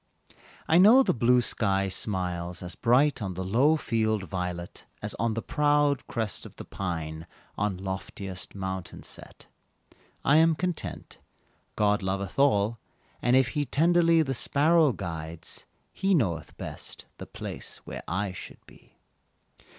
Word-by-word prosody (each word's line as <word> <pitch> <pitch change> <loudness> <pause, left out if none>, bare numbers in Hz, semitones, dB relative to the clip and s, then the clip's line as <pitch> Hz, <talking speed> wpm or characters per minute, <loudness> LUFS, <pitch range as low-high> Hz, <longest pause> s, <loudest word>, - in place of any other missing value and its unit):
I 165 - +5
know 225 +8 +8
the - - +2
blue 125 +1 +4
sky 100 -4 +1
smiles 90 -3 -2
as 90 0 -4
bright 125 +6 +3
On 95 -3 -3
the 95 - -3
low 130 +12 +3
field 110 -6 0
violet, 90 0 -5
As - - -3
on 115 -2 0
the 115 - -3
proud 145 -2 +2
crest 110 -4 -3
of - - -11
the - - -9
pine 80 -3 -5 0.3
On 100 -2 -1
loftiest 95 0 -6
mountain 95 -2 -5
set. - - -9 0.8
I 145 - +5
am 165 0 +5
content 180 0 -4 0.6
God 105 -1 +2
loveth 95 +3 -3
all, 115 -5 +3 0.4
And 120 +1 +3
if 130 -2 +4
He 145 +3 -1
tenderly 165 +3 +4
The 135 -3 -2
sparrow 150 +4 +3
guides, 80 -5 -6 0.3
He 195 0 +2
knoweth 95 - -1
best - - -8
The - - -8
place - - -7
where - - -6
I 95 +3 -1
should 90 - -10
be. - - -20
105 Hz, 145 wpm, -27 LUFS, 95-145 Hz, 0.8 s, know